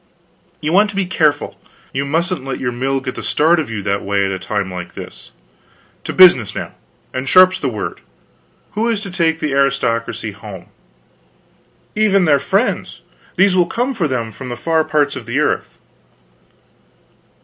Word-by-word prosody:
You 155 +2 -1
want 205 +3 +5
to 200 - -8
be 195 -1 0
careful; 155 -5 0 0.3
you 140 +1 -1
mustn't 170 +2 -1
let 135 -1 -4
your 125 - -1
mill 135 +2 -1
get 130 -1 -4
the - - -7
start 165 +3 +2
of 150 - -3
you 110 -3 -4
that 100 0 -1
way, 100 0 0
at 95 - -1
a 95 - -3
time 100 0 -3
like 90 -1 -7
this. - - -10 0.8
To - - -3
business 170 - +6
now - - -5 0.4
and 130 +1 -3
sharp's 185 0 +6
the 140 - -1
word. 105 -4 -5 0.7
Who 225 +3 0
is 225 -3 0
to 200 -3 -7
take 165 -3 +1
the 150 - -2
aristocracy 135 -4 0
home?" - - -11 1.3
"Even 200 -3 +3
their 145 -3 +4
friends. 195 - -1 0.3
These 190 -1 +4
will 175 -2 +3
come 245 +8 -1
for 185 -10 0
them 120 -5 -2
from 125 +4 -8
the 120 - -5
far 160 +4 +1
parts 145 -2 +1
of 125 -4 -8
the 120 +3 -2
earth." 150 - -1
145 Hz, 175 wpm, -18 LUFS, 125-185 Hz, 1.3 s, business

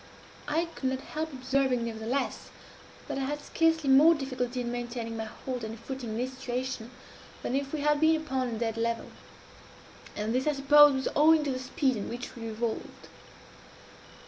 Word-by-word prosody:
I 315 +3 +1
could 260 - -1
not 260 0 -2
help 315 +2 -4
observing, 260 -2 0
nevertheless, 230 +4 -3 0.6
that - - -3
I 270 - -1
had 295 +2 -2
scarcely 320 0 +1
more 295 +5 +7
difficulty 255 -3 -3
in 240 -1 -3
maintaining 240 -1 -4
my 220 0 -3
hold 250 +2 -6
and 220 0 -6
footing 260 0 -6
in 215 - -3
this 255 +2 -2
situation, 250 -2 -3 0.5
than 250 - -1
if 275 0 -1
we 310 - -2
had 295 0 +2
been 320 0 +5
upon 265 -5 -2
a 230 -2 -3
dead 225 0 -2
level; 230 0 -2 1.0
and 215 +2 -2
this, 260 +3 0
I 300 - +3
suppose, 290 +1 +7
was 265 - -1
owing 310 +1 +6
to 285 - -1
the 255 - -2
speed 260 -1 0
at 205 - -4
which 245 +1 -6
we 230 -1 -6
revolved. 225 +1 -4
260 Hz, 180 wpm, -29 LUFS, 235-285 Hz, 1.0 s, more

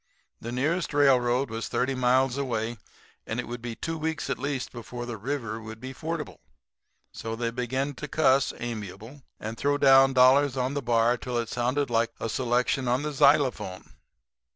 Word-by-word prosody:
The 115 - -6
nearest 150 +5 -1
railroad 130 -3 +3
was 115 0 -4
thirty 130 +2 0
miles 130 0 +2
away; 120 -4 -2 0.5
and - - -3
it - - -4
would 120 +1 -6
be 120 -1 -5
two 165 +5 -4
weeks 160 0 -2
at - - -2
least 140 -1 -3
before 120 0 -7
the 120 -1 -5
river 115 -1 -4
would 110 0 -9
be 130 +3 -7
fordable. 160 +2 -5 0.7
So 115 0 -5
they 115 0 -2
began 130 +4 -2
to 150 +3 -7
cuss, 135 -2 +3
amiable, 110 +3 -7 0.2
and 110 +1 -6
throw 145 +1 +1
down 135 -1 +6
dollars 130 +1 +5
on 130 +1 0
the 145 - -2
bar 120 0 +2
till 125 0 -4
it 115 -1 -2
sounded 125 +3 -1
like 115 0 +2
a 115 - -3
selection 125 +2 0
on 125 +3 +1
the 150 0 -3
xylophone. 135 -10 +2
125 Hz, 175 wpm, -27 LUFS, 120-140 Hz, 0.7 s, down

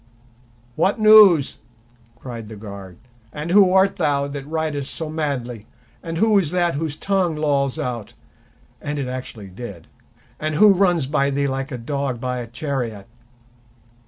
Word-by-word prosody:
"What 190 +8 +1
news?" 210 -9 +6 0.6
cried 120 -2 -8
the 110 - -9
guard. 100 -4 -10 0.3
"And 150 +3 -5
who 195 -1 +6
art 190 +1 +3
thou 140 -1 +1
that 140 -1 -7
ridest 155 -3 -2
so 160 -2 -4
madly, 125 -8 -4 0.3
and 165 0 -5
who 215 +2 +4
is 170 -6 0
that 175 0 +1
whose 150 0 -3
tongue 190 -4 0
lolls 140 -3 0
out"—and 125 +4 -8
it 135 -3 -3
actually 125 -5 -7
did—"and 120 - -8
who 210 +7 +7
runs 175 -6 +2
by 140 0 +1
thee 140 0 0
like 135 0 -3
a 125 - -4
dog 135 0 -3
by 125 0 -3
a 120 - -6
chariot?" 120 -5 -4
140 Hz, 145 wpm, -21 LUFS, 125-165 Hz, 0.6 s, who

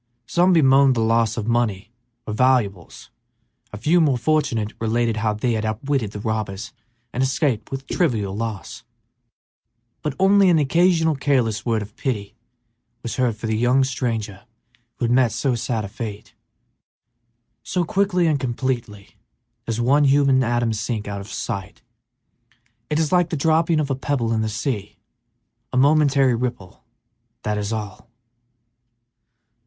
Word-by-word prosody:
Some 180 +6 +3
bemoaned 135 -5 +5
the 115 - 0
loss 115 0 +1
of 110 - -2
money 115 -3 0 0.3
or 105 - -4
valuables; 110 -7 0 0.6
a 105 - -7
few, 160 +11 +3
more 140 -5 +2
fortunate, 125 -7 0
related 115 0 0
how 105 -1 0
they 120 +3 -1
had 110 -1 -1
outwitted 110 +2 -1
the 105 - -8
robbers 110 +2 -4 0.4
and 125 - -1
escaped 130 -4 0
with 135 0 -5
trivial 110 - -1
loss, 110 -4 -5 1.2
but 150 -3 -3
only 195 0 +5
an 170 - +4
occasional 160 +2 +3
careless 130 -6 0
word 110 -2 +1
of 105 +1 -13
pity 105 -7 -3 0.7
was 115 - -4
heard 125 -4 +1
for 110 - -7
the 110 0 0
young 125 +4 +3
stranger 115 -6 -3 0.5
who - - -2
had 115 - 0
met 125 -2 +3
so 135 -3 0
sad 115 -2 -2
a - - -5
fate. 105 0 -7 1.3
So 180 - -1
quickly 185 0 +1
and 155 -3 +2
completely 120 -5 -4 0.5
does 115 0 -2
one 140 +5 +3
human 135 -1 +4
atom 120 -1 0
sink 110 0 -3
out 100 -1 -4
of 100 +1 -10
sight! 100 0 -5 1.1
It 150 - 0
is 160 -2 0
like 175 -2 +3
the 160 - -2
dropping 160 +2 +2
of 145 -2 -1
a - - +1
pebble 130 -4 -1
in 110 - 0
the 110 - -1
sea: 110 -2 -4 0.7
a 130 - -2
momentary 140 -2 +4
ripple, 115 -6 -4 0.6
that 105 0 -1
is 105 +1 -3
all! 105 -4 -6
120 Hz, 150 wpm, -22 LUFS, 110-140 Hz, 1.3 s, bemoaned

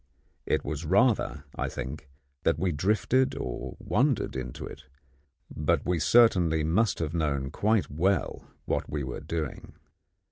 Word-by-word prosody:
It - - +1
was 75 +2 -3
rather, 100 - +2
I - - -2
think, 65 +2 -6 0.3
that - - +2
we 90 +2 0
drifted 105 - +1
or 60 - -5
wandered - - +1
into 65 -2 -5
it; 70 0 -10 0.7
but 75 0 +1
we 90 -2 +1
certainly 85 -4 +4
must 95 +7 +2
have 80 -2 -3
known 70 -5 -1
quite 110 -1 +1
well 90 +4 0 0.2
what - - -1
we 70 0 -2
were 65 -1 -5
doing. 80 -4 -5
80 Hz, 140 wpm, -28 LUFS, 70-95 Hz, 0.7 s, certainly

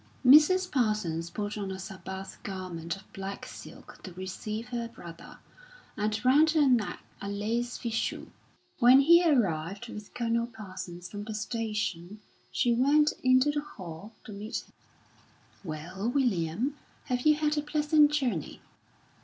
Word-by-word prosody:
Mrs. 335 +8 +7
Parsons 210 - 0
put 210 +2 -4
on 200 -1 -3
a 190 - -5
Sabbath 190 0 -8
garment 180 -4 -5
of 195 0 -17
black 195 +1 -6
silk - - -12
to 185 - -9
receive 210 +5 -5
her 235 -1 -3
brother, 170 -7 -12 0.6
and 215 +3 -2
round 295 +5 +6
her 310 -3 +4
neck 240 -5 +1 0.2
a 200 - -4
lace 230 +4 -2
fichu. 230 -1 -2 0.5
When 255 +2 +8
he 340 +5 +7
arrived 205 - +1
with 210 +1 -9
Colonel 235 -1 0
Parsons 185 -6 -8
from 205 +2 -7
the 220 -1 -5
station, 210 -4 -3 0.3
she 240 - +2
went 290 +5 +4
into 255 +3 +5
the 295 0 -1
hall 190 - -10
to - - -10
meet 210 +3 -5
him. - - -26 0.9
"Well, 180 +6 -4
William, 245 - 0 0.3
have 250 -3 -1
you 305 - +6
had 300 0 0
a 295 - 0
pleasant 300 0 +3
journey?" 250 - -1
220 Hz, 145 wpm, -29 LUFS, 190-260 Hz, 0.9 s, When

